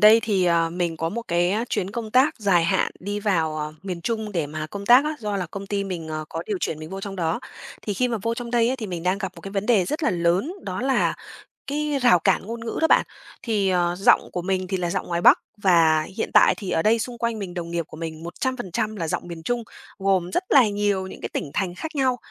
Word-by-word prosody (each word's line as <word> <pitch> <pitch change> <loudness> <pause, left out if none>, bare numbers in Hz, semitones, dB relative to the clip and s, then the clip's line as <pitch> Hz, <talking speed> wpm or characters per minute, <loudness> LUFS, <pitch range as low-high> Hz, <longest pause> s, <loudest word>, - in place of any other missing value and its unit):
đây 215 +2 +8
thì, 195 -5 +1
ờ, 165 -1 +2
mình 170 -2 -2
có 165 - -1
một 230 +7 -4
cái, 175 +1 +2
a, 215 +4 0
chuyến 190 +1 -1
công 220 -1 -5
tác 260 +5 +4
dài 190 -6 +3
hạn - - +1
đi 205 +3 -3
vào, 165 -7 +1
ờ, 150 0 -4
miền 185 -3 -5
Trung 220 +1 -3
để 165 -5 -1
mà 155 +1 -5
công 200 +4 -7
tác 245 +5 +7
á, 305 0 -1
do 210 -2 -2
là 185 -2 -2
công 200 +4 -7
ty 200 0 -1
mình, 175 -4 -5
ờ, 155 0 -4
có 165 - -4
điều 205 -3 -2
chuyển 155 - -2
mình 155 +1 -8
vô 195 0 -5
trong 195 0 -6
đó, 170 +3 -1 0.4
thì 205 - -3
khi 250 +4 +1
mà 230 -2 -1
vô 230 0 0
trong 235 0 -6
đây 235 -1 +3
ấy, 260 - 0
thì 225 -4 -5
mình 175 -4 -5
đang 185 +2 +1
gặp 195 -2 -4
một - - -10
cái 195 - -8
vấn 200 0 -2
đề 220 -7 +4
rất 300 - -3
là - - +3
lớn, 175 - +1
đó 185 +1 -3
là 265 0 +2 0.5
cái 295 +1 -1
rào 240 -8 +6
cản 165 - +2
ngôn 230 +2 -5
ngữ 225 - -3
đó 320 - +4
bạn. - - +5 0.4
Thì, 210 -5 +1
ờ, 175 -1 +1
giọng 195 - +4
của 180 - -3
mình 185 0 -1
thì 190 0 -1
là 175 -1 -1
giọng - - -2
ngoài 170 0 -1
Bắc - - +7 0.2
và 165 -5 +4
hiện - - -2
tại - - +7
thì 195 - -6
ở 160 - +2
đây 225 +2 +3
xung 240 +2 -4
quanh 230 -1 -1
mình, 190 -3 -5
đồng 170 -2 -5
nghiệp 170 0 -1
của - - -11
mình 160 -1 -6
100% 215 +2 -3
là 165 -4 -3
giọng 165 - -3
miền 170 -1 -8
Trung, 240 +4 -1 0.4
gồm 190 -2 +1
rất 360 - 0
là 255 -5 +6
nhiều 205 -2 0
những - - -10
cái - - -4
tỉnh 140 - -3
thành 185 -3 -1
khác 315 - -6
nhau 260 -2 +2
195 Hz, 270 wpm, -24 LUFS, 170-225 Hz, 0.5 s, đây